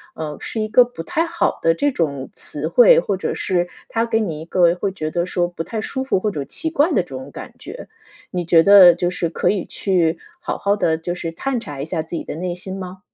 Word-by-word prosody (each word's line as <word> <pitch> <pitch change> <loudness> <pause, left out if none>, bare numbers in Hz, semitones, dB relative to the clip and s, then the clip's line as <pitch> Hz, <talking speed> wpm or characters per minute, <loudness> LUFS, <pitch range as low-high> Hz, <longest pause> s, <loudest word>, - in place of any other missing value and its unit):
呃， 150 -2 -5
是 220 - -4
一 215 - -1
个 245 +3 +6
不 240 -9 -8
太 325 - 0
好 340 0 -1
的 165 - +3
这 285 +11 0
种 140 - -2
词 150 +1 -6
汇， 235 +1 +7
或 195 +2 -2
者 - - -2
是 175 -2 0 0.2
他 230 0 0
给 225 -1 0
你 165 -7 -3
一 160 - -8
个 170 -1 +3
会 190 +2 -2
觉 155 -4 -4
得 175 0 0
说 175 -1 0
不 175 -2 -5
太 220 +4 -4
舒 265 - -4
服 265 - +1
或 210 +1 -1
者 145 -6 -4
奇 320 - -3
怪 320 -1 +3
的 - - +2
这 175 - -20
种 130 +1 -7
感 - - -9
觉， - - -9 0.4
你 180 -2 -3
觉 165 -1 +5
得 190 -3 +8
就 175 0 0
是 180 -1 -2
可 - - 0
以 195 -4 0
去 175 -4 0 0.2
好 350 - -4
好 200 +1 +1
地 160 -5 +1
就 175 +2 -4
是 165 -2 -5
探 260 +6 -2
查 145 -10 -7
一 - - -3
下 165 -1 -2
自 160 +2 -7
己 - - -4
的 - - -6
内 175 +1 -3
心 190 +1 -7
吗？ 185 0 -8
180 Hz, 275 characters per minute, -20 LUFS, 165-210 Hz, 0.4 s, 得